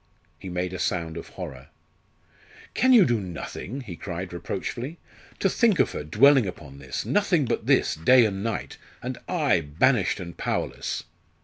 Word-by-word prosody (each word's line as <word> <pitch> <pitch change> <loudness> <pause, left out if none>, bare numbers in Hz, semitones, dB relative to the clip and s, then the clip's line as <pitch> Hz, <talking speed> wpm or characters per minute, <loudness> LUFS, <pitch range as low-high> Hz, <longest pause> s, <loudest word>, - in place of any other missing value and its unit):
He 95 - -7
made 90 +1 -2
a 95 - -5
sound 85 -3 -1
of 85 - -7
horror. 70 -8 -8 1.1
"Can 260 - +3
you 235 -6 +8
do 120 -3 +1
nothing?" 95 - -6
he 105 -9 -8
cried 90 +1 -6
reproachfully. 120 - -4 0.4
"To - - +2
think 215 0 +3
of - - +2
her - - -5
dwelling 125 - +5
upon 70 -6 -9
this 65 -2 -5
nothing 190 -8 +2
but 120 - -2
this, - - +3
day 120 +10 +5
and 95 -2 -2
night 115 -2 -3 0.3
and 125 +1 -4
I, 150 - +2
banished 75 0 +2
and 85 -1 -7
powerless!" - - -3
95 Hz, 165 wpm, -25 LUFS, 85-135 Hz, 1.1 s, you